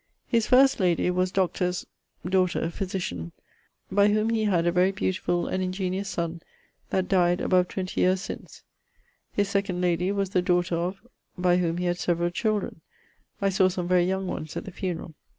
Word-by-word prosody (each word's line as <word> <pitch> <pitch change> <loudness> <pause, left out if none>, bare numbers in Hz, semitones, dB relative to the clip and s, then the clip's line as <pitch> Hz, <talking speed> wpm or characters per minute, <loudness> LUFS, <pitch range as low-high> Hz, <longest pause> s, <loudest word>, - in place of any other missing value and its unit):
His 230 -3 +1
first 265 +1 +5
lady 180 -1 +2
was 185 0 0
Dr. 185 -1 +1
...'s 180 0 -3 0.4
daughter, 180 -3 +1
physitian,... 175 - -4 0.6
by 200 +1 +5
whom 215 +2 +2
he 220 -1 +1
had 175 -5 +2
a 175 - +3
very 180 +2 +3
beautifull 185 -2 -1
and 185 - -1
ingeniose 185 +1 -2
son 170 -2 -3 0.5
that 190 -1 0
dyed 180 -2 +3
above 180 -1 +2
20 185 0 -3
yeares 185 +1 +3
since. 190 - -8 0.7
His 200 -1 0
2d 200 -2 -1
lady 180 +1 +1
was 200 -2 -1
the 180 - +2
daughter 180 -1 +1
of... 180 +6 -3 0.3
by 180 -1 +3
whom 170 -2 0
he 180 - -2
had 175 0 0
severall 175 0 0
children: 210 -4 -1 0.6
I 195 - +4
sawe 190 0 +3
some 180 -1 -3
very 180 -1 +3
young 190 +1 -1
ones 155 -4 -5
at - - -5
the 190 - -7
funerall. 175 -2 -4
185 Hz, 180 wpm, -26 LUFS, 175-195 Hz, 0.7 s, first